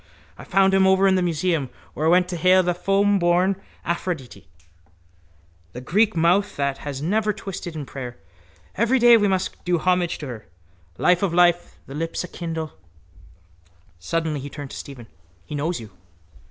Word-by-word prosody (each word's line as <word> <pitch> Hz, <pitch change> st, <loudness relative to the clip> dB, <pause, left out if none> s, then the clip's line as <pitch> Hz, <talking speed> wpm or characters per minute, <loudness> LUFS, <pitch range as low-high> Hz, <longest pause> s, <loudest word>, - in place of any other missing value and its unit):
I -, -, -11 dB
found 195 Hz, 0 st, +3 dB
him 190 Hz, 0 st, +4 dB
over 190 Hz, +1 st, +4 dB
in 190 Hz, -, +4 dB
the 185 Hz, -, +2 dB
museum 165 Hz, -4 st, 0 dB, 0.2 s
where 155 Hz, -, -1 dB
I -, -, +5 dB
went 180 Hz, +1 st, +4 dB
to 180 Hz, -, -3 dB
hail 185 Hz, +2 st, +4 dB
the 175 Hz, 0 st, +1 dB
foamborn 195 Hz, 0 st, +2 dB, 0.2 s
Aphrodite. 170 Hz, -6 st, -4 dB, 1.3 s
The 125 Hz, -, -7 dB
Greek 205 Hz, -, +2 dB
mouth 175 Hz, +5 st, +2 dB
that 140 Hz, -1 st, -1 dB
has 140 Hz, -1 st, -6 dB
never 210 Hz, +5 st, +1 dB
been -, -, -10 dB
twisted 175 Hz, -3 st, -6 dB
in 150 Hz, -2 st, -5 dB
prayer. 125 Hz, -2 st, -7 dB, 0.6 s
Every 230 Hz, +6 st, +2 dB
day 240 Hz, -1 st, +7 dB
we 205 Hz, -2 st, +3 dB
must 190 Hz, -1 st, -2 dB
do 175 Hz, -1 st, +1 dB
homage 180 Hz, +1 st, +1 dB
to 150 Hz, -, -7 dB
her. 115 Hz, -7 st, -8 dB, 0.5 s
Life 180 Hz, 0 st, +3 dB
of 185 Hz, -4 st, 0 dB
life, 175 Hz, -1 st, +3 dB
thy 135 Hz, -, -10 dB
lips 165 Hz, +4 st, -3 dB
enkindle. 165 Hz, -3 st, -5 dB, 1.3 s
Suddenly 160 Hz, -, -2 dB
he 140 Hz, +2 st, -7 dB
turned 145 Hz, -2 st, -8 dB
to -, -, -8 dB
Stephen: 130 Hz, -4 st, -9 dB, 0.4 s
—He -, -, -9 dB
knows 155 Hz, +4 st, -2 dB
you. 110 Hz, -3 st, -11 dB
175 Hz, 170 wpm, -23 LUFS, 150-190 Hz, 1.3 s, day